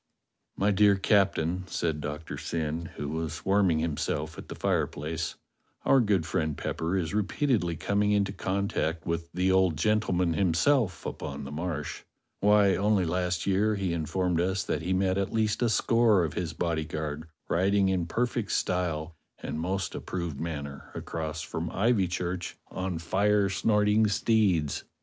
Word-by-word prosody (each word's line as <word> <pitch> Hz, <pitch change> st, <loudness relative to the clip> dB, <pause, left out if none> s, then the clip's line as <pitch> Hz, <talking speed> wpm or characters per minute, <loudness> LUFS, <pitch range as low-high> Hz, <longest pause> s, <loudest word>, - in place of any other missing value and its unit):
"My 100 Hz, +1 st, +2 dB
dear 100 Hz, 0 st, +5 dB
Captain," 95 Hz, -3 st, +2 dB
said 80 Hz, -4 st, -2 dB
Doctor 75 Hz, +2 st, -5 dB
Syn, 80 Hz, 0 st, -3 dB
who 75 Hz, -, -4 dB
was 80 Hz, +1 st, -4 dB
warm 100 Hz, 0 st, +4 dB
ing 80 Hz, -, +2 dB
himself 80 Hz, -1 st, -2 dB
at -, -, -9 dB
the -, -, -7 dB
fireplace, 80 Hz, +2 st, -1 dB, 0.5 s
"our 135 Hz, -, +5 dB
good 100 Hz, -8 st, +2 dB
friend 80 Hz, -3 st, -1 dB
Pepper 85 Hz, +4 st, -2 dB
is 85 Hz, -2 st, -2 dB
repeatedly 105 Hz, -, +1 dB
coming 100 Hz, +5 st, +1 dB
into 100 Hz, -1 st, +2 dB
contact 95 Hz, -5 st, -1 dB
with 85 Hz, 0 st, -3 dB
the 90 Hz, +1 st, +1 dB
old 95 Hz, -4 st, +3 dB
gentleman 90 Hz, -2 st, +1 dB
himself 95 Hz, -, +2 dB
upon 70 Hz, 0 st, -5 dB
the 70 Hz, -, -7 dB
Marsh. 80 Hz, -1 st, -4 dB, 0.4 s
Why, 105 Hz, -1 st, +5 dB
only 100 Hz, -2 st, +2 dB
last 90 Hz, +1 st, -1 dB
year 100 Hz, +3 st, +2 dB
he 95 Hz, -3 st, -1 dB
in 80 Hz, -2 st, -2 dB
formed 90 Hz, -3 st, +1 dB
us 95 Hz, +2 st, 0 dB
that -, -, -2 dB
he 90 Hz, +3 st, -3 dB
met 95 Hz, 0 st, +2 dB
at 100 Hz, -, -1 dB
least 110 Hz, -1 st, 0 dB
a 120 Hz, -, +3 dB
score 110 Hz, -3 st, +3 dB
of 80 Hz, -, -2 dB
his 85 Hz, -3 st, -3 dB
bodyguard 80 Hz, -2 st, -3 dB, 0.2 s
riding 95 Hz, +2 st, +2 dB
in 90 Hz, -3 st, 0 dB
perfect 120 Hz, +2 st, -1 dB
style 85 Hz, -3 st, -1 dB, 0.2 s
and 75 Hz, -, -5 dB
most 95 Hz, +3 st, -2 dB
approved 85 Hz, -6 st, -4 dB
manner 70 Hz, -4 st, -5 dB
across 80 Hz, -1 st, -4 dB
from 80 Hz, +1 st, -4 dB
Ivychurch 90 Hz, -4 st, 0 dB, 0.2 s
on 95 Hz, -2 st, -3 dB
fire 100 Hz, +4 st, +2 dB
snorting 105 Hz, +2 st, +3 dB
steeds. 100 Hz, -8 st, +1 dB
90 Hz, 155 wpm, -28 LUFS, 80-100 Hz, 0.5 s, dear